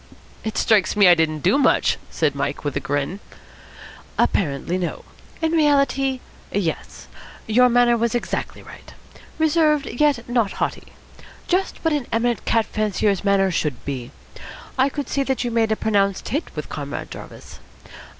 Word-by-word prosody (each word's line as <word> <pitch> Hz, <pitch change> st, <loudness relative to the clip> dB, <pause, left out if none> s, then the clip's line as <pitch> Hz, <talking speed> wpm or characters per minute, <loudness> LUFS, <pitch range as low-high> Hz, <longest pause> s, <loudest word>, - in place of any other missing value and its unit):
"It 220 Hz, -, -4 dB
strikes 215 Hz, -3 st, +3 dB
me 205 Hz, -2 st, +6 dB
I 175 Hz, -, +9 dB
didn't 160 Hz, -2 st, 0 dB
do 195 Hz, -, +3 dB
much," -, -, +3 dB
said 155 Hz, -3 st, 0 dB
Mike 140 Hz, +1 st, -3 dB
with 145 Hz, -2 st, -3 dB
a -, -, +1 dB
grin. 145 Hz, +7 st, -2 dB, 1.0 s
"Apparently, 170 Hz, +1 st, 0 dB
no. 175 Hz, -, -4 dB, 0.4 s
In 320 Hz, -, +2 dB
reality, 275 Hz, -4 st, +2 dB, 0.3 s
yes. 185 Hz, -5 st, -3 dB, 0.4 s
Your 250 Hz, +3 st, +4 dB
manner 240 Hz, 0 st, +4 dB
was 235 Hz, 0 st, 0 dB
exactly 240 Hz, -, -3 dB
right. -, -, -13 dB, 0.4 s
Reserved, 310 Hz, -2 st, +2 dB
yet 275 Hz, -3 st, +1 dB
not 235 Hz, -4 st, +1 dB
haughty. -, -, -3 dB, 0.6 s
Just 375 Hz, +2 st, 0 dB
what 325 Hz, -, +3 dB
an 285 Hz, -5 st, -2 dB
eminent 235 Hz, +1 st, 0 dB
cat 225 Hz, -1 st, +2 dB
fancier's 210 Hz, -2 st, 0 dB
manner 195 Hz, -1 st, +3 dB
should 150 Hz, -5 st, -2 dB
be. 130 Hz, -3 st, -4 dB, 0.7 s
I 265 Hz, +1 st, +3 dB
could 285 Hz, 0 st, -5 dB
see 275 Hz, -, -1 dB
that 265 Hz, -2 st, -1 dB
you 240 Hz, -, -2 dB
made 225 Hz, -1 st, +1 dB
a -, -, +3 dB
pronounced 200 Hz, -3 st, 0 dB
hit 295 Hz, +7 st, -2 dB
with -, -, -5 dB
Comrade -, -, -6 dB
Jarvis. -, -, -11 dB
225 Hz, 155 wpm, -22 LUFS, 185-270 Hz, 1.0 s, I